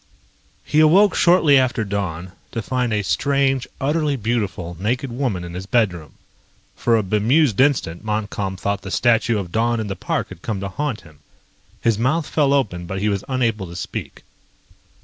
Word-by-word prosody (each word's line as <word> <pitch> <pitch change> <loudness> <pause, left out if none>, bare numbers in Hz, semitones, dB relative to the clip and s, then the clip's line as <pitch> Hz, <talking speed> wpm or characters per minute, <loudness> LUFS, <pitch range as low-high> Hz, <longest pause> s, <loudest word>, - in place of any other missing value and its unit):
He 150 - +1
awoke 185 +6 +6
shortly 165 -6 +5
after 125 -3 0
dawn 95 -3 -3 0.2
to 115 - -3
find 125 -1 -1
a 105 -1 0
strange, 135 +6 +1
utterly 150 +1 0
beautiful 100 -7 -2
naked 125 +6 -1
woman 120 -8 -2
in 85 0 -8
his 95 +2 -6
bedroom. 90 - 0 0.6
For 115 -1 +2
a 110 - 0
bemused 110 +6 +2
instant 125 - +1
Montcalm 105 -3 -3
thought 100 +1 -2
the 95 - -7
statue 115 +1 +2
of 95 -4 -5
Dawn 115 +2 +1
in 110 - -2
the 100 -2 -4
park - - -2
had 95 -2 -11
come 105 -1 -3
to 100 0 -4
haunt 135 +3 -3
him. 80 -4 -18 0.6
His 115 -2 +1
mouth 150 +7 +1
fell 145 -2 +1
open 95 -11 0
but 95 +2 -4
he 105 +2 +1
was 100 -2 -1
unable 115 -7 0
to 85 - -10
speak. 90 - -6
110 Hz, 175 wpm, -21 LUFS, 95-135 Hz, 0.6 s, awoke